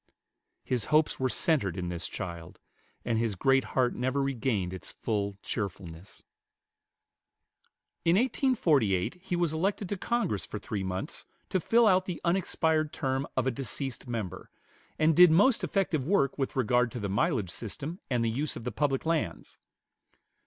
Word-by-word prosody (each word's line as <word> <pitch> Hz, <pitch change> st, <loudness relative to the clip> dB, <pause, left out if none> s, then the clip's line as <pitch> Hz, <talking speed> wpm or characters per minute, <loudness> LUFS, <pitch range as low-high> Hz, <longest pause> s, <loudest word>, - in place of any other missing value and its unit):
His 125 Hz, -5 st, -2 dB
hopes 155 Hz, 0 st, +2 dB
were 130 Hz, 0 st, +1 dB
centered 115 Hz, -, +1 dB
in 90 Hz, -1 st, -3 dB
this 90 Hz, 0 st, -4 dB
child; 85 Hz, -2 st, -7 dB, 0.5 s
and 115 Hz, -2 st, +1 dB
his 115 Hz, -3 st, 0 dB
great 135 Hz, +7 st, +3 dB
heart 125 Hz, -2 st, +3 dB
never 130 Hz, +3 st, -1 dB
regained 120 Hz, -9 st, -1 dB
its 95 Hz, -, -8 dB
full 100 Hz, -3 st, -2 dB
cheerfulness. 95 Hz, -3 st, -6 dB, 1.8 s
In 165 Hz, +1 st, +4 dB
1848 165 Hz, -, +2 dB
he 180 Hz, -1 st, -2 dB
was 170 Hz, -3 st, +1 dB
elected 190 Hz, +4 st, -1 dB
to 205 Hz, -, -2 dB
Congress 230 Hz, -, -1 dB
for -, -, -5 dB
three 100 Hz, 0 st, -4 dB
months 95 Hz, 0 st, -4 dB, 0.2 s
to 185 Hz, -, +1 dB
fill 230 Hz, +7 st, +4 dB
out 185 Hz, -3 st, +4 dB
the 180 Hz, -3 st, -4 dB
unexpired 160 Hz, -3 st, +1 dB
term 135 Hz, +1 st, -2 dB
of 130 Hz, -, +2 dB
a 130 Hz, -, +2 dB
deceased 135 Hz, +1 st, -4 dB
member, 105 Hz, -6 st, -5 dB, 0.5 s
and 155 Hz, 0 st, +3 dB
did 180 Hz, +1 st, +9 dB
most 205 Hz, +10 st, +4 dB
effective 175 Hz, -8 st, 0 dB
work 160 Hz, -8 st, +2 dB
with 135 Hz, -2 st, -2 dB
regard 125 Hz, -1 st, +2 dB
to 125 Hz, -, -4 dB
the 100 Hz, -, -2 dB
mileage 105 Hz, -, 0 dB
system 145 Hz, -, -6 dB
and 120 Hz, -3 st, +1 dB
the 115 Hz, -, +1 dB
use 140 Hz, +6 st, -1 dB
of -, -, -7 dB
the 125 Hz, -, -3 dB
public 140 Hz, -1 st, 0 dB
lands. 160 Hz, -, -2 dB
130 Hz, 160 wpm, -29 LUFS, 105-165 Hz, 1.8 s, did